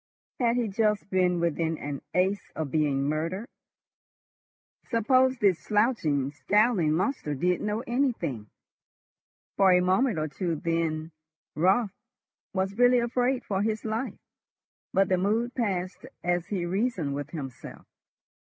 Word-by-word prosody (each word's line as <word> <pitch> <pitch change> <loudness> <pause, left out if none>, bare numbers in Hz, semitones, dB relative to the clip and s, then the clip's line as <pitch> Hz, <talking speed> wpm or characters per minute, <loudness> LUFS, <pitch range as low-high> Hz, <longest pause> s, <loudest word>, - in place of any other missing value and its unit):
Had 235 -2 +2
he 245 -2 +1
just 210 0 0
been 180 -2 +2
within 165 -1 0
an 145 -1 -5
ace 190 +3 +1
of 155 -4 -3
being 145 -3 +1
murdered? 165 +9 -2 1.4
Suppose 255 +3 +3
this 195 -6 +3
slouching, 205 - +1
scowling 205 0 +2
monster 180 - -1
did 180 +6 0
know 210 +2 -1
anything? 230 - -1 1.1
For 195 -1 +6
a 180 - +6
minute 190 +4 +2
or 155 0 -1
two 165 +3 -2
then 165 0 -2 0.4
Raut 190 +6 +3 0.6
was 195 +2 -2
really 245 0 +6
afraid 245 +2 0
for 195 -1 -1
his 215 +1 -1
life, 220 +4 -3 0.7
but 195 0 +3
the 185 -1 +2
mood 225 +6 0
passed 185 -6 -2 0.2
as 175 -1 0
he 185 -4 -2
reasoned 185 - -1
with 145 +1 -4
himself. 135 -6 -8
190 Hz, 130 wpm, -27 LUFS, 160-225 Hz, 1.4 s, For